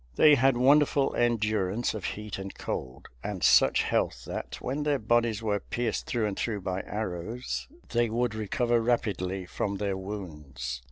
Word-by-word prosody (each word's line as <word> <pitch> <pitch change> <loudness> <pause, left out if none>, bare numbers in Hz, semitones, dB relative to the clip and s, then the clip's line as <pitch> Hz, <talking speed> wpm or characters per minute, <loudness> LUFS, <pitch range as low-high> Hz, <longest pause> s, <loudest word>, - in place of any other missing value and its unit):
They 150 - +7
had 135 -2 +4
wonderful 140 +1 +4
endurance 110 -2 +1
of 110 -3 -5
heat 105 -1 -4
and 95 0 -7
cold, 65 -1 -5 0.2
and - - -4
such - - +5
health - - 0
that, - - -5
when 135 +4 -3
their 145 -1 +2
bodies 115 -1 +1
were 105 -2 +1
pierced 120 0 -2
through 115 -3 0
and 100 -2 -2
through 105 -2 -2
by 95 0 -2
arrows, 110 +3 -4 0.2
they 120 -1 +2
would 120 0 0
recover 115 +2 +1
rapidly 95 -6 -1
from 100 +2 -3
their 100 -1 -1
wounds. 75 -11 -6
110 Hz, 160 wpm, -28 LUFS, 95-120 Hz, 0.2 s, They